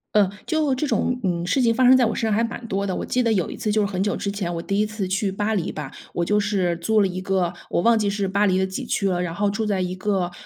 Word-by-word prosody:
呃， 200 -2 +4 0.2
就 310 -4 +1
这 285 +3 -1
种， 250 -2 0
嗯， 175 -2 -1
事 260 +9 +1
情 230 -2 +3
发 260 - +2
生 260 +1 +8
在 245 - +4
我 225 - -1
身 - - -3
上 220 -1 0
还 225 - +2
蛮 230 +1 -3
多 200 0 -1
的。 185 - -2
我 - - -3
记 250 - 0
得 230 -2 +2
有 185 -4 0
一 - - -7
次 215 - -2
就 215 0 +2
是 - - +2
很 190 -2 -2
久 205 0 0
之 200 - -3
前， 185 -4 -3
我 165 - -3
第 195 +3 -1
1 215 - +3
次 215 -2 -4
去 200 +1 0
巴 205 +3 -1
黎 180 - -2
吧， 150 -3 -6 0.2
我 175 - 0
就 210 +4 +2
是 190 -5 0
租 215 +5 +2
了 195 - +3
一 185 0 -5
个 185 -2 0 0.2
我 - - +1
忘 230 +1 +4
记 205 -1 +1
是 200 -1 -1
巴 200 +2 +1
黎 185 -1 +2
的 190 - +2
几 190 - -5
区 195 - 0
了， 180 -1 0
然 170 -1 -3
后 205 +1 +1
住 215 +2 -2
在 200 -3 0
一 180 0 -2
个 185 -2 -1
200 Hz, 340 characters per minute, -23 LUFS, 185-220 Hz, 0.2 s, 生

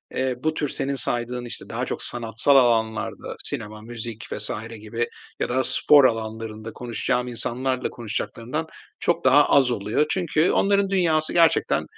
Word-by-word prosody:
eee, 130 -1 0
bu 155 0 +1
tür 150 -2 -2
senin 140 +1 -2
saydığın, 120 -1 -2
işte, 120 - -8
daha - - -2
çok - - -4
sanatsal 120 +3 +1
alanlarda 115 -4 +1
sinema, 105 0 -4
müzik 115 0 -6
vs. 105 0 -2 0.3
gibi 115 +2 -2 0.3
ya - - -1
da 130 +2 +1
spor 145 +2 +5
alanlarında 110 -1 -2
konuşacağım 125 +1 -2
insanlarla 125 +2 -1
konuşacaklarından 120 +6 -4 0.3
çok 170 - 0
daha 140 +3 +6
az 130 -3 +5
oluyor. 105 +7 0
Çünkü 170 -2 +1
onların 200 0 +2
dünyası 165 -5 +1
gerçekten 170 -1 +3
125 Hz, 145 wpm, -24 LUFS, 115-145 Hz, 0.3 s, daha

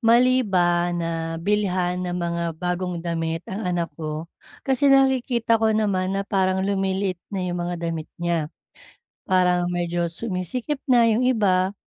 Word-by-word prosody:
mali 250 +2 +5
ba, 175 -5 +2
na 165 -1 -3
bilihan 180 -1 0
ng 180 -1 -3
mga 170 -1 -2
bagong 180 +1 -2
damit 165 0 -2
ang 190 0 -4
anak 175 -2 -1
ko? 155 +1 -4 0.4
Kasi 270 0 +3
nakikita 255 -4 +3
ko 220 -1 +3
naman 195 -3 0
na 195 - -1
parang 190 -1 +1
lumiliit 195 -2 -1
na 195 -3 -3
yung 175 -1 -2
mga 175 - -3
damit 165 -2 -4
niya, 170 -3 -1 0.8
parang 180 -1 +3
medyo 175 -1 -1
sumisikip 225 - -3
na 240 -2 +5
yung 250 +4 +2
iba. 195 -5 +2
185 Hz, 145 wpm, -23 LUFS, 175-215 Hz, 0.8 s, mali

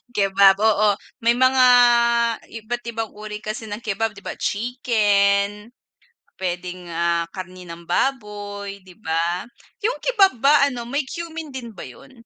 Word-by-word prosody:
Kebab, 195 -1 +5
oo. 215 0 +3 0.3
May 230 +1 +4
mga, 260 0 +4 1.0
iba't 240 +3 -4
ibang 225 -1 -4
uri 210 0 -7
kasi 215 +1 -6
ng 205 - -4
kebab, 220 +1 -1
'di - - -12
ba, - - -4
chicken, 205 -3 +1 0.7
puwedeng, 180 0 -4
ah, 170 0 +1
karne 185 -1 -8
ng 170 0 -10
baboy, 205 -3 -2
'di 185 - -15
ba. 170 +3 -1 0.3
'Yong 470 +3 -1
kebab 410 -6 +4
ba 280 +2 +5
ano, 245 -3 -5
may 280 +5 -2
cumin 325 -1 -6
din 255 -4 -8
ba 190 - -9
'yon? 125 - -15
210 Hz, 140 wpm, -22 LUFS, 190-240 Hz, 1.0 s, Kebab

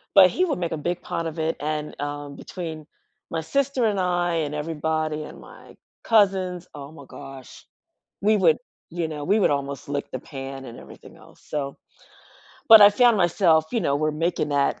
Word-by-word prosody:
but 190 -2 +9
he 365 - +1
would 310 - -2
make 170 -2 -2
a - - -2
big 175 +4 -3
pot 170 0 -4
of 160 0 -6
it, 160 +1 0
and, 150 0 -4
um, 145 0 -5
between 160 -3 -7 0.5
my 165 - -2
sister 275 - 0
and 205 -3 +1
I, 175 -1 0
and 150 -3 -2
everybody, 155 0 -2
and - - -11
my - - -15 0.3
cousins 190 -5 +2
oh 140 0 -9
my 145 -3 -13
gosh, 135 -1 -12 0.6
we 215 +2 +3
would, 170 -6 +4 0.3
you 170 -1 -3
know 150 -2 -6
we 205 +8 +2
would - - +3
almost 140 -1 -3
lick 145 0 -3
the 130 - -3
pan 135 -1 -8
and 120 -2 -10
everything - - -14
else, - - -19
so 140 -2 -3 0.9
but 225 -1 +11
I 205 0 +9
found 240 +1 +4
myself, 175 -3 +3
you 235 - +1
know 140 - +1
we're 155 +1 0
making 155 0 -1
that, 140 -1 +1
160 Hz, 190 wpm, -24 LUFS, 145-185 Hz, 0.9 s, but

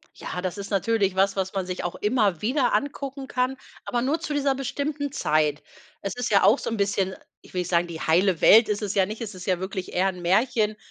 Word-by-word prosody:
Ja, 180 - -5
das 185 +1 -3
ist 200 +1 -7
natürlich 200 -1 +1
was, 195 +1 +2
was 190 -1 -2
man 190 -2 -2
sich 180 0 -4
auch 175 - -3
immer 210 -6 +1
wieder 250 +3 +1
angucken 275 -1 -2
kann, 255 +1 0 0.3
aber 240 - -1
nur 285 +6 0
zu 300 - -4
dieser 275 -2 +1
bestimmten 285 +2 -3
Zeit. 155 - +1 0.4
Es 195 -1 -4
ist 245 -3 -3
ja 200 - +5
auch 210 +7 +6
so - - -3
'n 225 - -3
bisschen 195 -2 0 0.3
ich - - -18
will 180 - 0
nicht 180 - -5
sagen, 175 0 +2
die 165 -2 -7
heile 175 +2 +2
Welt, 225 +1 +7
ist 210 0 -1
es 205 -2 -3
ja 195 -2 +4
nicht, 215 +4 -7
es 220 -2 -5
ist 185 - -9
ja 185 -2 +1
wirklich 190 0 -5
eher 185 +2 +2
'n 180 -2 -7
Märchen. 215 +4 +2
200 Hz, 240 wpm, -25 LUFS, 185-245 Hz, 0.4 s, Welt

